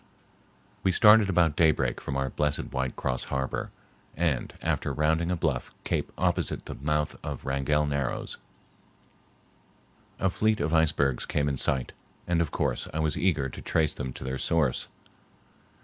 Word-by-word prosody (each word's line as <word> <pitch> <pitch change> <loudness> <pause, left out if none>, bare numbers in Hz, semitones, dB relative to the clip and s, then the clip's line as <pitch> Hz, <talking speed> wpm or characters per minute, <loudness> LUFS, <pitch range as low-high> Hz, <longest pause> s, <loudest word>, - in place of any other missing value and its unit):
We 95 - +2
started 105 +2 +6
about 85 -4 +3
daybreak 75 -7 +2
from 70 - -3
our 65 -1 -1
blessed 75 -1 -1
white 65 -1 -1
cross 65 - -2
harbor, 65 -1 -2 0.5
and, 80 -6 0
after - - -1
rounding 80 +3 +1
a 90 - +1
bluff 80 - -1
cape - - -1
opposite - - 0
the - - -5
mouth 75 +2 -1
of - - -5
Wrangell 70 +3 +1
Narrows, 70 -3 -2 1.8
a 95 - +1
fleet 110 +3 +1
of 75 +3 -1
icebergs 75 -5 +2
came 70 0 0
in 70 - 0
sight, 65 -1 0 0.3
and 85 -1 +1
of 80 - 0
course - - -1
I - - -4
was 80 -1 +1
eager 80 -7 +1
to - - -9
trace 80 -2 +1
them 65 - -4
to - - -8
their 65 0 -3
source. 80 -6 +1
75 Hz, 155 wpm, -28 LUFS, 70-85 Hz, 1.8 s, started